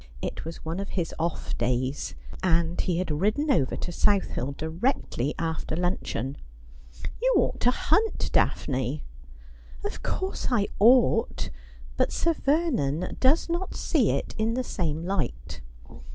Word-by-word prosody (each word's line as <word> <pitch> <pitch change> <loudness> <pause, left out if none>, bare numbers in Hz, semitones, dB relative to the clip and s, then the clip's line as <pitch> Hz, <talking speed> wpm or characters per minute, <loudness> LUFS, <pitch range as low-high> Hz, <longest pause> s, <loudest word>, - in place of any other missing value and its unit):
It - - -4
was 165 0 -7
one 165 +3 -2
of 200 - -4
his 170 -2 -1
off 170 +1 -2
days, 125 +3 -1 0.3
and 170 -1 +2
he 180 -3 0
had 180 -3 -1
ridden 210 - +1
over 135 - +2
to 175 - -4
South 200 +2 +2
Hill 135 +3 -3
directly 160 - -1
after 160 -1 -2
luncheon. 160 -6 -2 0.4
' 65 - -10
You - - +4
ought - - +1
to 245 - +4
hunt. 420 - +1
Daphne.' 130 +2 +1 0.4
' - - -19
Of - - -3
course 380 +1 -2
I 220 -5 +2
ought; 245 +5 +4 0.5
but - - +2
Sir 335 - +2
Vernon 265 - 0
does 270 +5 +4
not 345 +2 -2
see - - +2
it - - -1
in 225 +2 +1
the 255 - 0
same 165 -8 -2
light. 145 - -3
175 Hz, 150 wpm, -27 LUFS, -, 0.5 s, You